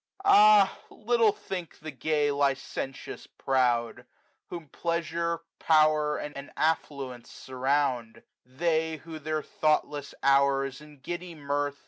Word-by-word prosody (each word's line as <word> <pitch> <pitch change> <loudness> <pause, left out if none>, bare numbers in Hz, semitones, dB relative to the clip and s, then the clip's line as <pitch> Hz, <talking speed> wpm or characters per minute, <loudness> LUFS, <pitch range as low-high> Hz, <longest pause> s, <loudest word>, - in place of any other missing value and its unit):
Ah 210 - +6
little 230 -1 +2
think 180 -4 -7
the 155 0 -8
gay 145 +2 0
licentious 135 -1 -3
proud. 120 -3 0 0.4
Whom 170 -3 -8
pleasure, 170 0 -2 0.2
power, 155 -1 +3
and 145 -1 -7
affluence 140 -6 -2
surround; 130 -3 -2 0.2
They, 160 +4 -1
who 160 +1 -9
their 155 0 -3
thoughtless 150 -2 -1
hours 135 0 +2
in 150 -2 -16
giddy 175 +3 -6
mirth. 145 -1 -2
150 Hz, 105 wpm, -28 LUFS, 135-165 Hz, 0.4 s, Ah